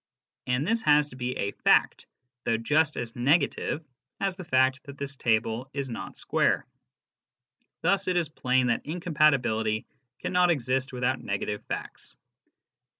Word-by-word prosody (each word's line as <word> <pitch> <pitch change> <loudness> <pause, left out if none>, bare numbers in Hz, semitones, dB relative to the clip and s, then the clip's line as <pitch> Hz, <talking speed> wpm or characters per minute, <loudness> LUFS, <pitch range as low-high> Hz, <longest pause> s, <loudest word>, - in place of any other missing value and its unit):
And 125 +3 +1
this 225 +4 +1
has 150 -3 +4
to 125 - -12
be 125 0 -3
s,fact, 100 - +2 0.4
though 115 - +1
just 150 +6 +1
as 115 -1 -5
negative 145 +3 +1 0.3
as 195 -2 -1
the 185 - -8
fact 130 -3 +2
that 140 -1 -10
this 140 0 -5
table 115 +1 0
is 140 -3 -3
not - - -7
square. - - +1 1.2
Thus 195 0 +1
it 180 -1 +1
is 170 -2 +1
plain 130 -4 +1
that 120 -2 0
incompatibility 140 -10 +1 0.3
cannot 180 -1 +2
exist 130 -3 0
without 125 +1 -1
negative 105 +1 -3
facts. - - -6
135 Hz, 140 wpm, -27 LUFS, 125-155 Hz, 1.2 s, has